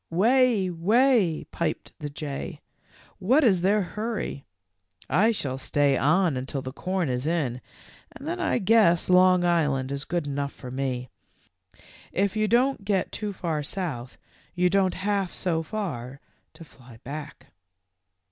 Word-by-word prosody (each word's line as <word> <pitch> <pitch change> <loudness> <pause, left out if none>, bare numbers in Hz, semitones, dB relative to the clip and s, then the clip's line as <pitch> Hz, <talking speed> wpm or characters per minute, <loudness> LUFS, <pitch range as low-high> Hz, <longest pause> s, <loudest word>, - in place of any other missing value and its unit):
"Wheh, 230 +3 +3
wheh," 200 - +2
piped 170 - -3
the 150 -2 -5
jay, 145 -1 -6 0.6
"what 260 +11 +3
is 195 -8 +4
their 200 +3 +3
hurry? 210 - -4 0.6
I 215 +8 +3
shall 135 - -3
stay 140 0 +2
on 170 +2 +2
until 130 +1 -4
the 130 - -6
corn 185 +3 -2
is 125 +2 -2
in, 140 -7 -1 0.5
and 280 - -10
then 345 +2 -3
I 350 - +1
guess 195 -6 +3
Long; 180 0 +5
Island 145 -6 +1
is 140 +1 -4
good 175 -3 -2
enough 140 0 -3
for 125 - -9
me. 130 -2 -3 1.0
If 200 +2 0
you 215 0 +1
don't 245 +1 +2
get 195 -2 0
too 210 -2 -4
far 165 -5 -2
South 140 -6 -5 0.4
you 180 0 +2
don't 190 -2 +2
have 195 -1 -1
so 165 -3 -1
far 155 - -5 0.4
to - - -11
fly 125 -5 -16
back." 150 - -8
175 Hz, 145 wpm, -26 LUFS, 140-205 Hz, 1.0 s, Long